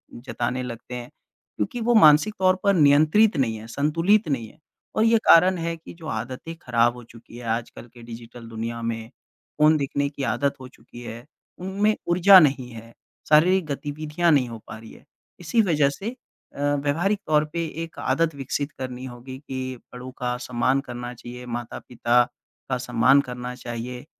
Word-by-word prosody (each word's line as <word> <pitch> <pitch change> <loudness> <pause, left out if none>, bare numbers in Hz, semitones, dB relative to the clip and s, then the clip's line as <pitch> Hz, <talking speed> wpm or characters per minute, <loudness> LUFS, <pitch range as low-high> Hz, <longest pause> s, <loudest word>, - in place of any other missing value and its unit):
जताने 125 0 -3
लगते 120 0 -7
हैं। 120 0 -7 0.5
क्योंकि 245 -4 -2
वो 240 - +5
मानसिक 150 +8 +4
तौर 185 -1 +4
पर 200 -1 +4
नियंत्रित 155 +5 +4
नहीं 115 -4 +1
हैं, 110 +1 -10
संतुलित 165 - +2
नहीं 125 -7 -2
हैं - - -20 0.4
और 215 - +3
ये 230 0 +5
कारण 180 +2 +6
है 170 0 -2
कि 165 - -12
जो 160 - -9
आदतें 125 +9 -5
खराब 120 -1 +2
हो 125 - -11
चुकी 115 0 -14
हैं 120 - -9
आजकल 115 +1 -3
के 120 - -14
डिजिटल 115 0 -10
दुनिया 115 +1 -5
में, 115 -1 -4 0.5
फ़ोन 155 +1 +5
देखने 140 0 -1
की 140 -1 -6
आदत 140 +4 0
हो 130 - -8
चुकी 120 -1 -14
है, 120 0 -8 0.3
उनमें 200 +4 0 0.2
ऊर्जा 185 +2 +8
नहीं 135 -6 +2
है, 115 0 -11 0.4
शारीरिक 175 +4 +5
गतिविधियाँ 150 +3 -1
नहीं 130 -5 +3
हो 115 - -7
पा 110 - -8
रही 110 0 -13
हैं। - - -17 0.3
इसी 180 +7 +2
वजह 150 -8 +2
से 195 +10 -5 0.5
अ, - - -10 0.2
व्यवहारिक 175 +8 0
तौर 150 -1 +3
पे 170 -1 -1 0.2
एक 165 - -10
आदत 165 -2 0
विकसित 140 +2 -3
करनी 130 0 -5
होगी 130 +1 -9
कि 130 -1 -4 0.2
बड़ों 125 +1 -8
का 125 -1 -2
सम्मान 125 +2 +1
करना 120 0 -6
चाहिए, 125 +1 -10
माता-पिता 120 0 0 0.5
का - - 0
सम्मान 130 +5 +3
करना 125 0 -5
चाहिए 120 +2 -6
130 Hz, 175 wpm, -24 LUFS, 120-160 Hz, 0.5 s, ऊर्जा